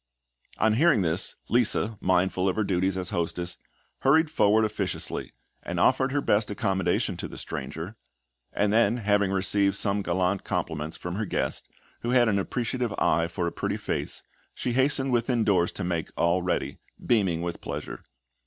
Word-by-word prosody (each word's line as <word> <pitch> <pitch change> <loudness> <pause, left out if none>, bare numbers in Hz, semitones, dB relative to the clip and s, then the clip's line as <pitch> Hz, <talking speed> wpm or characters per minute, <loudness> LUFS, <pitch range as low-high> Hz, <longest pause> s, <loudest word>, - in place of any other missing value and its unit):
On 110 0 +3
hearing 140 - +4
this, 85 +2 0
Lisa, 115 -2 +2
mindful 95 +1 +2
of 95 - -1
her 110 - +1
duties 95 -1 0
as 90 -1 -1
hostess, 85 +1 -1 0.4
hurried 155 +3 +4
forward 110 -6 +4
officiously, 105 -3 -3 0.3
and - - -4
offered 130 0 +3
her 145 +1 +1
best 105 -3 +2
accommodation 95 -2 0
to - - -4
the - - -10
stranger; 85 +7 -6 0.6
and 105 0 +1
then, 115 0 +3
having 100 -3 +2
received 100 0 +2
some 100 0 0
gallant 95 +1 0
compliments 80 0 -3
from 90 +1 -5
her 110 - -1
guest, - - -2 0.3
who 120 - -4
had 125 -1 +4
an 100 -2 +2
appreciative 120 +3 -2
eye 85 +1 +2
for 85 +1 -3
a 85 - -1
pretty - - -2
face, - - -3 0.3
she 125 - -2
hastened 135 +1 +2
within 120 -1 +1
doors 90 -5 +2
to 100 - -5
make 85 -2 -2
all 85 +2 +2
ready, 80 -6 -2 0.3
beaming 95 -8 +2
with 85 -1 -4
pleasure. - - -6
100 Hz, 165 wpm, -27 LUFS, 90-115 Hz, 0.6 s, hearing